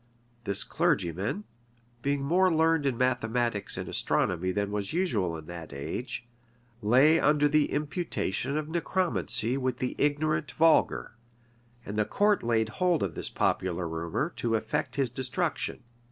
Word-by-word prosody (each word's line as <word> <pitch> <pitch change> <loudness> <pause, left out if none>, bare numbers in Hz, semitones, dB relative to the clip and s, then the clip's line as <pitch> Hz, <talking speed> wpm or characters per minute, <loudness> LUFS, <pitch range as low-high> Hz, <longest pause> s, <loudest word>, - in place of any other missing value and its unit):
This 100 -2 +1
clergyman, 95 - 0 0.6
being 140 +1 0
more 180 +6 +3
learned 160 -2 +3
in 130 -4 0
mathematics 120 -3 0
and - - -4
astronomy 90 +1 0
than 100 +1 -1
was 105 +2 -3
usual 110 - 0
in 80 - -10
that 85 -3 -8
age, 120 - -4 0.5
lay 130 +9 +5
under 150 0 +4
the 150 0 +2
imputation 145 - -2
of 155 -1 -2
necromancy 160 - 0
with 130 -2 -1
the 125 - -2
ignorant 150 +1 0
vulgar; 165 0 +3 0.7
and 105 +2 -3
the 105 - +3
court 205 - +2
laid 110 -2 +1
hold 175 - +1
of 95 -4 -2
this - - -2
popular 90 -1 0
rumor 80 0 -2
to 115 -1 0
effect 110 - -2
his 135 -4 +1
destruction. 130 +3 -2
125 Hz, 140 wpm, -28 LUFS, 105-155 Hz, 0.7 s, lay